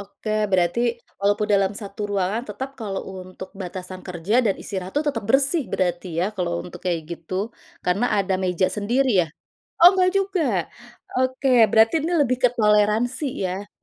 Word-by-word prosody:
Oke, 200 +2 -8 0.2
berarti 180 +4 +2 0.4
walaupun 205 +1 +1
dalam 200 -1 +3
satu 200 0 -9
ruangan 200 +4 0
tetap 260 +7 -5
kalau 195 -3 -3 0.2
untuk 185 0 -10
batasan 185 0 -7
kerja 190 +8 0
dan 200 -3 +2
istirahat 190 -2 -5
tuh 300 - +2
tetap 225 -7 -2
bersih 275 +4 +3
berarti 180 0 -1
ya 185 - +2
kalau 170 -2 -1
untuk 180 - -10
kayak 175 -2 0
gitu, 170 +2 -7 0.5
karena 195 +7 +1
ada 195 -1 +1
meja 185 -1 +1
sendiri 245 +6 +1
ya? - - -10 0.5
Oh 350 +3 +9
enggak 370 -1 +3
juga. 390 -3 0 0.8
Oke, 260 +1 0 0.2
berarti 225 +2 +5
ini 335 +3 -1
lebih 255 -3 +2
ke 250 - +7
toleransi 215 +6 +2 0.2
ya? 195 +3 -5
205 Hz, 160 wpm, -23 LUFS, 185-250 Hz, 0.8 s, Oh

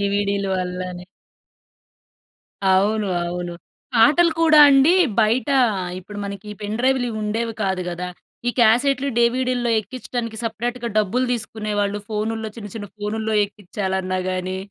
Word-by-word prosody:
డివిడి‌లు 200 0 0
అల్లానే. 180 0 -5 1.7
అవును. 205 +3 +2 0.2
అవును. 175 0 -4 0.4
పాటలు 310 +9 +5
కూడా 315 -2 +6
అండి 275 +4 +6 0.3
బయట 230 +6 +2 0.5
ఇప్పుడు 205 +3 -9
మనకి 200 +1 -7
పెన్ 210 +1 -3
డ్రైవ్‌లు 260 0 +2
ఇవి 215 - -4
ఉండేవి 225 +2 -2
కాదు 190 -1 0
గదా! 180 +1 -4 0.4
ఈ - - +3
క్యాసెట్‌లు 260 +5 +3
డివిడి‌లో 245 0 +1
ఎక్కించడానికి 235 +1 -5
సెపరేట్‌గా 235 +2 -3
డబ్బులు 220 +5 +1
తీసుకునేవాళ్ళు. 210 -3 -2
ఫోనుల్లో 220 +1 -2
చిన్న 205 -3 -8
చిన్న 205 - -6
ఫోనుల్లో 220 +1 -2
ఎక్కించాలన్నా 190 -2 -3
గాని 185 0 -3
215 Hz, 120 wpm, -21 LUFS, 200-240 Hz, 1.7 s, కూడా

